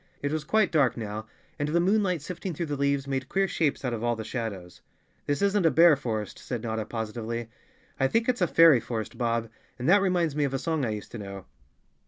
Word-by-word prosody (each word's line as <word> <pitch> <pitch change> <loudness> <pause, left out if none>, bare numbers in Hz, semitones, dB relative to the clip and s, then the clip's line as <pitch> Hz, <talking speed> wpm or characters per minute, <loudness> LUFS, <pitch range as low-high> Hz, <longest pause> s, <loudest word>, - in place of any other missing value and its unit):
It 145 - 0
was 155 -1 -2
quite 215 +5 +2
dark 140 -8 +3
now, 110 -1 -5 0.3
and 145 +1 -1
the 170 +3 +2
moonlight 185 -3 +1
sifting 180 +1 -5
through 170 - -2
the 145 -2 -3
leaves 140 0 0
made 135 -1 -3
queer 195 0 +1
shapes 150 -6 -1
out 125 - -1
of 115 -1 -4
all 120 0 +1
the 110 - -5
shadows. 105 -7 -5 0.5
"This 145 +7 0
isn't 200 -1 +2
a 165 - +5
bear 165 +2 +6
forest," 110 -6 -4
said 120 -3 -5
Notta 110 -2 -2
positively. 115 +1 -4 0.5
"I 135 - +3
think 230 +9 +1
it's 250 -4 0
a 180 - +4
fairy 165 -7 +6
forest, 110 -1 -5
Bob, 115 -1 0 0.3
and 125 +2 -3
that 195 +4 +6
reminds 175 -6 +1
me 150 - +1
of 135 -1 -1
a - - +1
song 155 0 -1
I - - -1
used 105 -1 -5
to 120 - -7
know." 100 -2 -8
140 Hz, 230 wpm, -27 LUFS, 115-170 Hz, 0.5 s, bear